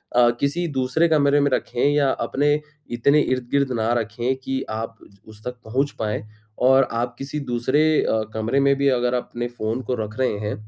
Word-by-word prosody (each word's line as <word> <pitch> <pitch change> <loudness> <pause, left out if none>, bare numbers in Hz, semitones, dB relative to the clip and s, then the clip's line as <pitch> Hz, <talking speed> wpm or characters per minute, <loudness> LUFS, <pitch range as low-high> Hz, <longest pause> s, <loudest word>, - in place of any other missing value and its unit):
अ, 120 -1 +6
किसी 165 +5 0
दूसरे 130 +6 +2
कमरे 145 -3 +3
में 140 -1 +2
रखें 125 -1 -1
या 145 -2 +3 0.2
अपने 145 +2 +2 0.3
इतने 130 +5 +3
इर्द-गिर्द 130 +1 0
ना 110 +1 +1
रखें 120 +4 -2
कि 135 0 -2
आप 115 +1 -5
उ 100 +2 -20
उस 110 0 -15
तक 125 0 -5
पहुँच 135 +6 0
पाएँ 105 -1 -2 0.4
और 130 +1 +5
आप 120 +1 -2
किसी 140 +2 -5
दूसरे 130 +1 0 0.2
अ, 110 -1 +1
कमरे 110 +5 0
में 140 0 +4
भी 140 0 +2
अगर 125 -1 +1
अपने 120 -1 -3
फ़ोन 120 0 -3
को - - -2
रख 105 -1 -5
रहे 125 -5 +1
हैं 105 0 -3
125 Hz, 190 wpm, -22 LUFS, 115-140 Hz, 0.4 s, अ